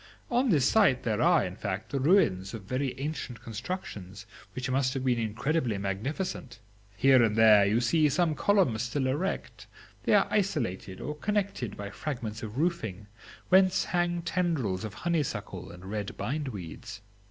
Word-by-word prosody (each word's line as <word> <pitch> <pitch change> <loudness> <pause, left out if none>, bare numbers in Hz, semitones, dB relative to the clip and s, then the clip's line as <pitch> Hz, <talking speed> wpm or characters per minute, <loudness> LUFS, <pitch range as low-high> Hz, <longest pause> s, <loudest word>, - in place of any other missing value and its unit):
On 250 +2 +2
this 150 - +4
site 195 - +4
there 110 -3 0
are, - - +4
in - - -6
fact, - - -4
the 140 - -1
ruins 115 - +2
of 110 - -8
very 130 +4 -3
ancient 140 -4 -4
constructions, 105 - -6 0.3
which 130 0 -3
must 130 +1 +1
have 135 -1 -2
been 125 -2 +2
incredibly 115 +2 -1
magnificent. 115 - -4 0.4
Here 130 +2 +6
and 110 -2 +2
there 110 -2 +7
you 110 +4 +2
see 150 +5 +3
some 170 +1 +2
columns 150 - +2
still 125 +3 -1
erect; 150 +9 -3 0.4
they - - +4
are - - +5
isolated 125 - -1
or 150 - -3
connected 195 - -2
by 100 0 -6
fragments 115 -7 -5
of 110 +2 -7
roofing, 115 - -1 0.4
whence 185 0 +5
hang 175 -1 -1
tendrils 160 - -1
of 110 -2 -6
honeysuckle 165 -5 -2
and 90 +1 -12
red 100 0 -4
bind 145 +2 -2
weeds. 100 -2 -8
130 Hz, 160 wpm, -29 LUFS, 105-165 Hz, 0.4 s, there